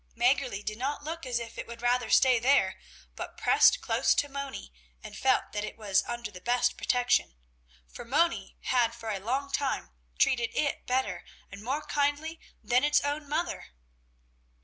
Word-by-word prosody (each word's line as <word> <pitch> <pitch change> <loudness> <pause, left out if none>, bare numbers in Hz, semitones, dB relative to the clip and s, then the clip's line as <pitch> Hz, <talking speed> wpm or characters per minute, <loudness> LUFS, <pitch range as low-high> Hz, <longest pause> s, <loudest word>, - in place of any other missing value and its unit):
Mäggerli 245 -4 +1
did 215 +1 -4
not 285 +3 -2
look 320 -1 -5
as 245 -1 0
if 235 -1 -6
it - - -5
would 235 0 -10
rather 245 0 +1
stay 255 -3 +5
there, 240 -6 +3 0.4
but - - -7
pressed - - +5
close - - +2
to 285 - +1
Moni 280 - -6 0.3
and - - -9
felt 260 -1 +1
that 210 0 -3
it - - -6
was 200 -4 +1
under 240 -3 -4
the 180 -2 -11
best 245 +2 +1
protection, 245 - +1 0.5
for - - -10
Moni 305 +8 0
had 235 -2 +1
for 225 -2 -5
a 200 - -3
long 265 +7 -2
time 275 - -1 0.3
treated 235 - +2
it 285 -2 -1
better 260 +1 -1 0.3
and 200 - -9
more 270 +7 -2
kindly 290 +3 -1 0.2
than 250 +2 +2
its 295 0 +4
own 290 0 -3
mother. 335 +3 -2
250 Hz, 170 wpm, -29 LUFS, 230-285 Hz, 0.5 s, stay